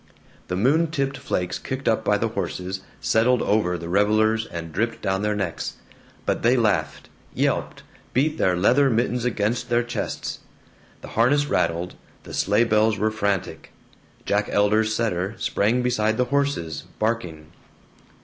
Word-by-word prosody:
The 90 - -2
moon 140 - +3
tipped 140 -4 -1
flakes 90 -1 -2
kicked - - -5
up - - +2
by - - +2
the - - -1
horses 95 +1 -4 0.2
settled 120 +2 +2
over 95 -4 +1
the 85 0 -7
revelers 110 +4 +2
and 85 -1 -7
dripped 115 +5 -2
down 95 0 0
their 105 0 0
necks, 95 -5 -3 0.5
but - - 0
they 120 +3 +4
laughed, 100 -9 0 0.3
yelped, - - -1 0.3
beat 150 +4 +1
their 90 - +3
leather 130 +9 +4
mittens 120 +1 0
against 110 0 -1
their 120 0 +2
chests. 120 - -4 0.6
The - - -9
harness 140 +6 +3
rattled, 85 -9 0 0.3
the - - -10
sleigh 105 +4 +2
bells 110 -1 +2
were 110 +2 +1
frantic, 100 -6 -2 0.5
Jack 105 +1 0
Elder's 105 +2 +2
setter 105 -3 -1
sprang 115 +3 +1
beside 110 -3 +1
the 125 - +2
horses, 140 - -1
barking. 90 -9 -2
110 Hz, 150 wpm, -23 LUFS, 95-120 Hz, 0.6 s, they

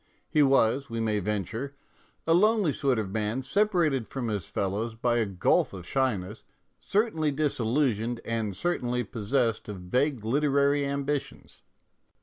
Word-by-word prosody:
He 150 - +2
was, 135 -1 +3
we 115 0 -3
may 110 -2 0
venture, 105 +7 -3 0.5
a 165 - +3
lonely 210 -1 +4
sort 135 -3 0
of 105 -3 -2
man 110 +5 -2
separated 160 - +1
from 125 -4 -4
his 100 -5 -3
fellows 105 +4 -2
by 120 +1 +1
a 115 -3 +1
gulf 95 0 +1
of 90 -3 -8
shyness, 110 -6 -1 0.4
cer 215 +3 +1
tainly 155 -4 -1
disillusioned 120 -4 0
and 110 -4 -2
certainly 125 - -1
possessed 115 0 -1
of 105 - -5
vague 125 +6 -1
literary 140 +2 +2
ambitions. 140 0 -4
125 Hz, 140 wpm, -27 LUFS, 110-140 Hz, 0.5 s, lonely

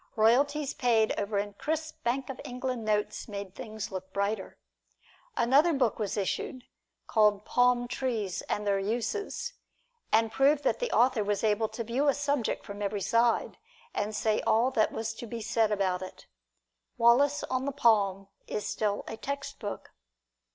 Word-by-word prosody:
Royalties 275 +6 +3
paid 225 -3 +2
over 205 0 -2
in 205 0 -2
crisp 315 +7 -4
Bank 255 +2 0
of 260 - -9
England 250 -1 -4
notes 210 -1 -1
made 200 -3 -6
things 215 0 -6
look 190 0 -6
brighter. 200 0 -2 0.8
Another 285 +8 +4
book 250 -7 +1
was 210 -2 -2
issued, 240 +6 -2 0.4
called, 210 -2 +3
"Palm 245 0 +3
Trees 225 -8 -2
and 210 - -1
Their 200 -1 +2
Uses," 320 - -2 0.6
and 225 0 +3
proved 280 +3 +3
that - - +1
the - - -1
author 245 -2 +3
was 205 +1 -1
able 220 0 +2
to 230 - -5
view 245 +6 0
a 280 - +4
subject 285 -4 -1
from 200 0 -7
every 205 0 -1
side, 230 +3 +1 0.3
and 210 +1 -2
say 215 0 +1
all 235 +4 +3
that 220 -5 +2
was 225 0 -3
to 235 +1 -8
be 235 0 -5
said 220 0 +1
about 190 -3 0
it. 185 - -9 0.7
"Wallace 250 +5 +4
on 255 0 -2
the 280 - -1
Palm" 200 -7 +2 0.2
is 210 - -3
still 205 -2 -1
a 225 - -5
textbook. 280 -7 -5
225 Hz, 160 wpm, -29 LUFS, 210-260 Hz, 0.8 s, Another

